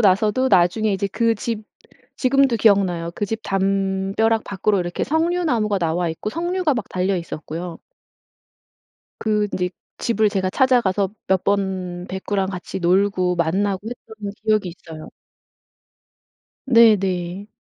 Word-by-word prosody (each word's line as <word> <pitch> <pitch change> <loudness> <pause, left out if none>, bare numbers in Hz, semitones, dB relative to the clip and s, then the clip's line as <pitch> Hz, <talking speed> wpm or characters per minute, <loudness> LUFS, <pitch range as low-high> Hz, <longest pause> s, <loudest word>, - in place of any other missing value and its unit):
나서도 215 +5 +3
나중에 195 +3 +3
이제 195 +1 -1
그 230 0 +2
집 220 0 -4 0.5
지금도 270 -2 +3
기억나요. 190 -6 +2
그 205 - -2
집 225 +2 -3
담벼락 195 +3 0
밖으로 200 0 0
이렇게 175 0 -2
석류 335 +4 0
나무가 215 -8 +1
나와 170 0 0
있고 165 +6 -5
석류가 345 -1 0
막 230 - -3
달려 185 +1 0
있었고요. 165 +1 -6 1.4
그 210 -1 +1
인제 180 -1 -1 0.3
집을 220 -2 +2
제가 190 -2 -1
찾아가서 210 -7 +2 0.2
몇 190 -1 +2
번 185 -3 -1
백구랑 190 +1 -2
같이 185 0 -6
놀고 180 0 +2
만나고 190 +5 0
했던 220 -4 -8
기억이 215 -4 +1
있어요. 160 -2 -11 1.6
네네. 200 -6 +3
200 Hz, 275 characters per minute, -21 LUFS, 185-220 Hz, 1.6 s, 나서도